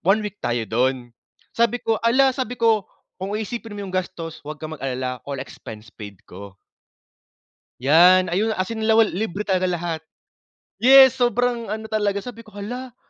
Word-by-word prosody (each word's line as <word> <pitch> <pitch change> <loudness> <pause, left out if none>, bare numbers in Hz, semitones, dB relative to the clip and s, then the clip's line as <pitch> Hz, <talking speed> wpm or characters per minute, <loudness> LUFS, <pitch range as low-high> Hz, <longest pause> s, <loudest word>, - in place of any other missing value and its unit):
one 210 +4 +2
week 210 0 -7
tayo 120 -1 -1
dun." 125 +1 -1 0.4
Sabi 235 +1 +2
ko, 225 -1 0
"Ala!" 260 +3 +4
sabi 250 -2 -4
ko, 225 -4 +2 0.3
"Kung 195 +2 -5
iisipin 220 +1 -5
mo 205 - -7
yung 185 - -9
gastos, 165 -4 -5
wag 150 0 -8
kang 155 0 -6
mag-alala. 125 -2 -4
All 140 -2 -5
expense 110 -4 -10
paid 100 -4 -11
ko." 100 +1 -11 1.2
Yan, 175 +8 +6
ayun 205 +6 0
as 185 - 0
in 220 - -4
lawal 220 0 +4
libre 210 +1 -4
talaga 185 -2 +1
lahat. 175 -3 -2 0.8
Yes, 265 0 +7
sobrang 245 -1 +1
ano 220 +2 -4
talaga, 205 -2 0
sabi 230 -2 -10
ko, 215 - -17
"Hala!" 245 +5 -7
200 Hz, 165 wpm, -22 LUFS, 150-230 Hz, 1.2 s, Yes